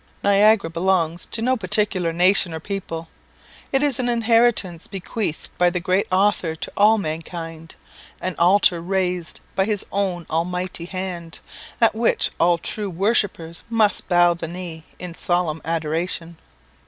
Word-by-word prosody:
Niagara 200 Hz, -1 st, +5 dB
belongs 170 Hz, -1 st, 0 dB
to 225 Hz, -, -2 dB
no 255 Hz, +2 st, +3 dB
particular 190 Hz, -4 st, 0 dB
nation 180 Hz, 0 st, +3 dB
or -, -, -4 dB
people. 165 Hz, -3 st, -5 dB, 0.6 s
It 270 Hz, +1 st, +2 dB
is 285 Hz, -4 st, +1 dB
an 245 Hz, -1 st, 0 dB
inheritance 230 Hz, -7 st, +2 dB
bequeathed 195 Hz, -2 st, -4 dB
by 180 Hz, 0 st, +5 dB
the 180 Hz, 0 st, -2 dB
great 185 Hz, +3 st, +1 dB
Author 185 Hz, -4 st, +2 dB
to -, -, -6 dB
all 215 Hz, +2 st, +5 dB
mankind, 165 Hz, -2 st, -6 dB, 0.4 s
an 185 Hz, -, -2 dB
altar 175 Hz, -1 st, +4 dB
raised 180 Hz, -2 st, -2 dB
by 190 Hz, -, +2 dB
his 210 Hz, -1 st, -1 dB
own 190 Hz, -4 st, -1 dB
almighty 180 Hz, +1 st, -2 dB
hand, 180 Hz, -3 st, -5 dB, 0.4 s
at 230 Hz, -, +4 dB
which 225 Hz, +1 st, +1 dB
all 175 Hz, 0 st, +4 dB
true 205 Hz, +4 st, -4 dB
worshippers 185 Hz, -3 st, 0 dB
must 220 Hz, -3 st, +1 dB
bow 175 Hz, -1 st, +5 dB
the 170 Hz, -1 st, -6 dB
knee 170 Hz, -2 st, -7 dB
in 180 Hz, -2 st, -7 dB
solemn 175 Hz, -3 st, -1 dB
adoration. 165 Hz, +1 st, -3 dB
180 Hz, 140 wpm, -22 LUFS, 165-200 Hz, 0.6 s, Niagara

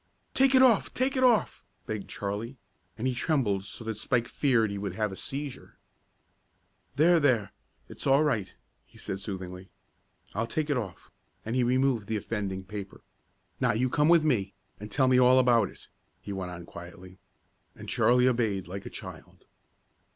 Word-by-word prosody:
"Take 270 Hz, 0 st, +4 dB
it 260 Hz, -, +7 dB
off! 235 Hz, -6 st, +4 dB
Take 265 Hz, +2 st, 0 dB
it 260 Hz, -, +1 dB
off!" 240 Hz, -4 st, +3 dB, 0.2 s
begged 110 Hz, -4 st, -5 dB
Charlie, 105 Hz, +6 st, -4 dB, 0.4 s
and 115 Hz, -, -4 dB
he 130 Hz, -, +1 dB
trembled 120 Hz, -8 st, 0 dB
so 105 Hz, -, -8 dB
that 110 Hz, -1 st, -4 dB
Spike 115 Hz, 0 st, 0 dB
feared 120 Hz, -7 st, +1 dB
he 100 Hz, -, -4 dB
would 100 Hz, -2 st, -4 dB
have 105 Hz, -1 st, -1 dB
a -, -, -6 dB
seizure. 140 Hz, +4 st, -6 dB, 1.2 s
"There 170 Hz, +3 st, +5 dB
there 125 Hz, -8 st, +2 dB, 0.4 s
it's -, -, -7 dB
all 135 Hz, +3 st, +5 dB
right," 105 Hz, -11 st, 0 dB, 0.3 s
he -, -, -21 dB
said 95 Hz, -, -5 dB
soothingly. 95 Hz, -2 st, -7 dB, 0.6 s
"I'll 115 Hz, +2 st, -1 dB
take 150 Hz, +3 st, -2 dB
it -, -, +2 dB
off," 100 Hz, -7 st, -6 dB, 0.3 s
and 115 Hz, +2 st, -3 dB
he 130 Hz, -, +3 dB
removed 125 Hz, -3 st, +1 dB
the 110 Hz, -, -1 dB
offending 100 Hz, -3 st, -4 dB
paper. 100 Hz, 0 st, -8 dB, 0.6 s
"Now -, -, +2 dB
you 125 Hz, +3 st, 0 dB
come 150 Hz, +1 st, +3 dB
with 170 Hz, -2 st, +6 dB
me, 105 Hz, -10 st, 0 dB, 0.2 s
and 105 Hz, +1 st, -8 dB
tell 130 Hz, +4 st, +2 dB
me 130 Hz, 0 st, +5 dB
all 125 Hz, +1 st, +6 dB
about 120 Hz, -5 st, +4 dB
it," -, -, -17 dB, 0.3 s
he 100 Hz, -, -7 dB
went 95 Hz, -2 st, -4 dB
on 85 Hz, -1 st, -8 dB
quietly. 90 Hz, +2 st, -12 dB, 0.6 s
And -, -, -11 dB
Charlie 125 Hz, +1 st, +3 dB
obeyed, 110 Hz, -7 st, 0 dB
like 95 Hz, +2 st, -7 dB
a -, -, -6 dB
child. -, -, -11 dB
115 Hz, 175 wpm, -28 LUFS, 100-135 Hz, 1.2 s, it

